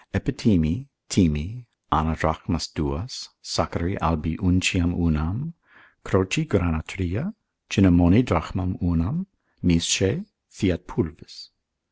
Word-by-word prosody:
Epithymi, 95 - +1 0.2
thymi, 95 +7 +1 0.2
ana 80 +2 +2
drachmas 80 0 -1
duas, 75 - -5
sacchari 90 +4 -2
albi 80 +1 0
unciam 90 -1 +2
unam, 85 - -1 0.5
croci 95 +11 +1
grana 85 - 0
tria, 100 - -4 0.3
Cinamomi 90 +3 +6
drachmam 90 0 -2
unam; 90 - 0 0.4
misce, 90 - +3 0.2
fiat 90 -3 -1
pulvis. - - -6
90 Hz, 90 wpm, -24 LUFS, 80-100 Hz, 0.5 s, Cinamomi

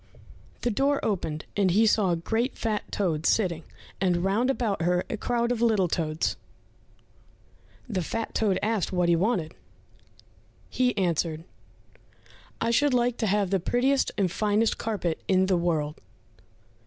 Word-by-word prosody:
The 240 - 0
door 275 +6 +1
opened, 160 -7 -2
and 200 -2 +2
he 210 +6 +4
saw 210 -3 +3
a 175 - +2
great, 225 +9 -2
fat 215 -2 -2
toad 160 -6 0
sitting, 175 -7 +1 0.4
and 180 -2 +1
round 210 +7 +1
about 225 -9 -1
her 180 +1 +1
a - - -1
crowd 235 +2 0
of 240 -2 -1
little 215 -6 +3
toads. 155 -1 -1 1.5
The 200 -6 -2
fat 225 +7 -4
toad 200 -4 +1
asked 215 -3 0
what 180 -2 +1
he 170 - +5
wanted? 175 -3 0 1.2
He 250 -2 +1
answered, 165 -3 0 1.2
"I 230 - 0
should 285 +2 +3
like 240 0 +1
to 220 - -1
have 200 -1 +1
the 195 - +2
prettiest 260 +9 +1
and 190 -4 +1
finest 215 +2 +1
carpet 195 -7 -2
in 190 -1 +3
the 190 -1 +2
world." 160 -4 -1
200 Hz, 150 wpm, -26 LUFS, 175-230 Hz, 1.5 s, he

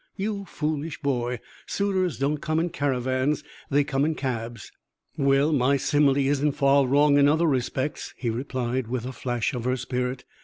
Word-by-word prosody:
"You 200 0 -3
foolish 155 -2 -3
boy! 125 -4 -1 0.3
Suitors 190 -4 0
don't 145 +2 0
come 155 +2 0
in 170 +2 0
caravans 130 -1 0 0.3
they 145 +1 +3
come 135 -1 0
in 155 +1 +1
cabs." 120 -5 -4 0.4
"Well, 140 +1 +3
my 140 0 +3
simile 140 0 +3
isn't 140 +1 +2
far 140 -1 +3
wrong 145 +2 +4
in 140 - +6
other 160 +3 +3
respects," 130 0 -1
he 120 -3 -1
replied, 125 0 -2
with 125 0 -3
a 130 - -4
flash 120 -1 -2
of 120 -2 -4
her 130 +1 +1
spirit. 125 0 -3
140 Hz, 165 wpm, -25 LUFS, 125-150 Hz, 0.4 s, in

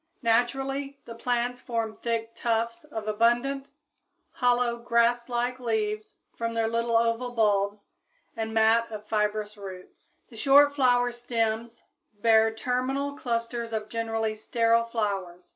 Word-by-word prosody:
Naturally 270 +4 0
the 230 - -8
plants 245 +1 -1
form 230 -2 -2
thick 230 0 -3
tufts 230 0 -1
of 220 -8 -6
abundant, 240 +6 +1 0.6
hollow, 245 -1 +2
grasslike 240 +1 +1
leaves 215 -3 -2 0.2
from 230 0 -3
their 225 -1 +1
little 230 0 +1
oval 230 +2 0
bulbs 205 -2 +1 0.5
and 220 -1 -3
mat 225 +1 +3
of 210 -1 -7
fibrous 210 0 -1
roots. 190 - -11 0.2
The 230 - -13
short 285 +4 +6
flower 245 -3 +3
stems 230 -1 -2 0.4
bear 220 0 +5
terminal 255 +5 -2
clusters 230 -2 -3
of 215 -1 -3
generally 225 -1 -1
sterile 230 +1 +2
flowers. 195 -6 -3
230 Hz, 125 wpm, -27 LUFS, 220-245 Hz, 0.6 s, short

